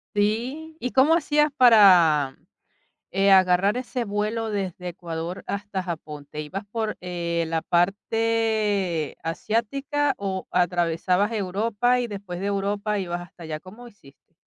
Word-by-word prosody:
Sí, 250 +10 -1
¿y 250 - -3
cómo 275 +5 +5
hacías 300 -2 +2
para, 180 - +6 0.7
eh, 195 +1 +2
agarrar 190 +1 +5
ese 250 -1 -3
vuelo 215 +2 -2
desde 185 -3 -4
Ecuador 170 0 -6
hasta 200 -1 -3
Japón? 150 -4 -7
¿Te 150 - -6
ibas 185 +7 -5
por, 220 -2 -2
eh, 170 -2 -2
la 165 -1 0
parte 205 -2 0
asiática 270 - -1
o 190 -2 -4
atravesabas 180 +3 +1
Europa 220 +5 0
y 245 - -1
después 195 -4 -7
de 195 - -4
Europa 200 +1 -1
ibas 175 -2 -3
hasta 175 0 -12
allá? 155 -1 -5
¿Cómo 215 +8 -13
hiciste? 160 -4 -22
200 Hz, 135 wpm, -24 LUFS, 175-225 Hz, 0.7 s, para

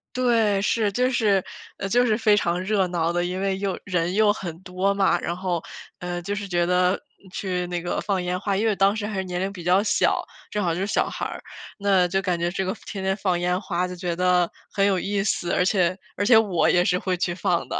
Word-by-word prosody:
对， 225 -5 +2
是， 210 0 +1
就 250 +4 +1
是， 210 -6 +2 0.4
呃， 195 - -3
就 245 +4 +3
是 220 -2 +2
非 215 -2 +4
常 175 -3 0
热 195 -1 +1
闹 170 -1 -1
的， 175 0 0
因 180 +1 -3
为 195 -1 0
又 195 -1 -2
人 180 -2 0
又 210 0 +4
很 170 -5 -7
多 185 +1 -1
嘛， 195 -1 +2
然 170 - -2
后， 180 -3 -2 0.4
呃， 175 0 -4
就 200 +4 -3
是 200 -2 -5
觉 175 -1 +1
得 180 +1 +2 0.3
去 180 -3 -2
那 175 -1 -3
个 175 - -2
放 195 -3 -1
烟 180 0 -1
花。 195 +1 -1
因 220 - 0
为 220 - +3
我 - - -1
当 195 +1 +3
时 215 -1 -3
还 215 - -5
是 - - -1
年 180 -1 -4
龄 195 +1 -2
比 175 -4 -9
较 180 +3 +4
小， - - +2 0.3
正 210 - -2
好 165 -1 +1
就 185 - -3
是 200 - -1
小 - - +1
孩， - - -5 0.4
那 195 -3 +3
就 195 +2 +1
感 180 -2 0
觉 170 +1 -1
这 190 0 -2
个 190 +4 -2
天 195 -2 -6
天 190 0 0
放 185 -4 0
烟 180 +1 0
花 180 -1 -1
就 180 - -7
觉 175 -1 -3
得 180 0 +2 0.2
很 200 -1 +2
有 195 -2 +2
意 200 +1 -1
思， 175 -4 -1
而 180 - +3
且 185 -2 +2 0.2
而 205 - 0
且 225 -1 +7
我 195 -7 +3
也 175 0 +4
是 180 0 +1
会 185 -1 -1
去 175 0 -1
放 175 -1 0
的。 - - -2
190 Hz, 270 characters per minute, -24 LUFS, 180-200 Hz, 0.4 s, 且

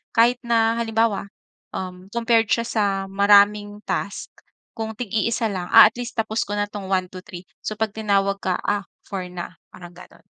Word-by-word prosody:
kahit 240 +2 +4
na, 230 -1 +1
halimbawa, 225 -3 0 0.5
um, 185 0 -6
compared 230 -2 +3
siya 230 - +1
sa 225 -2 0 0.3
maraming 205 +1 +4
task 200 +1 -4 0.4
kung 220 -1 -5
tig-iisa 225 0 -1
lang, 180 -2 -4
ah, - - +10
at - - -31
least 240 - -5
tapos 220 0 -1
ko 205 - -4
na 205 0 0
'tong 205 -2 -7
1, 185 -1 +1
2, 185 0 -9
3. 185 -4 -9 0.2
So, 215 - -4
'pag 220 -1 -1
tinawag 200 -2 +1
ka, 185 -2 -1
ah, 205 -1 -1 0.2
4 190 -3 -5
na, 180 -1 -8
parang 175 -1 -12
gano'n. 175 - -16
205 Hz, 180 wpm, -22 LUFS, 195-225 Hz, 0.5 s, ah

